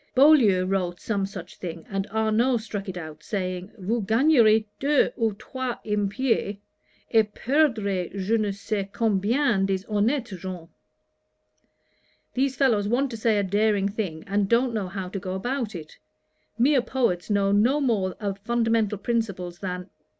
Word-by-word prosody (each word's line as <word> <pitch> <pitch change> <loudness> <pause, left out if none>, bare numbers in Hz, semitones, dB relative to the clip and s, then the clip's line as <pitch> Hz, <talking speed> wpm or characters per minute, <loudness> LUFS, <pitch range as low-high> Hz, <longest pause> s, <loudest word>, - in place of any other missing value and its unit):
Boileau 255 -10 +6
wrote 185 -2 -1
some 200 -3 -1
such 195 - -9
thing, 165 -2 -7
and 195 -1 -3
Arnaud 220 +4 +2
struck 210 -3 -5
it 180 - -5
out, 155 -3 -8
saying, 185 +1 -4
"Vous 220 +4 -1
gagnerez 225 -1 +4
deux 285 +1 +3
ou 225 -2 +1
trois 255 +4 -5
impies, 210 0 0 0.5
et 220 -2 +3
perdrez 220 - +1
je 195 +3 -1
ne 215 -2 +1
scais 200 0 -3
combien 225 +1 +1
des 195 -1 0
honnettes 225 +5 0
gens." 180 -2 -7 1.6
These 265 +1 0
fellows 230 -8 +2
want 255 +4 +1
to 230 - -5
say 220 -1 +2
a 205 - +2
daring 205 0 +1
thing, 190 -7 -4
and 200 0 0
don't 235 +1 +3
know 210 -4 -2
how 190 0 -5
to 195 +2 -5
go 185 -1 -4
about 240 +1 -3
it. 155 -3 -9 0.6
Mere 265 +3 +4
poets 235 -9 -1
know 200 -1 +2
no 235 +8 +3
more 210 -9 0
of 200 -2 -3
fundamental 225 -1 +1
principles 200 -5 -2
than 180 -1 -4
210 Hz, 150 wpm, -25 LUFS, 195-235 Hz, 1.6 s, Boileau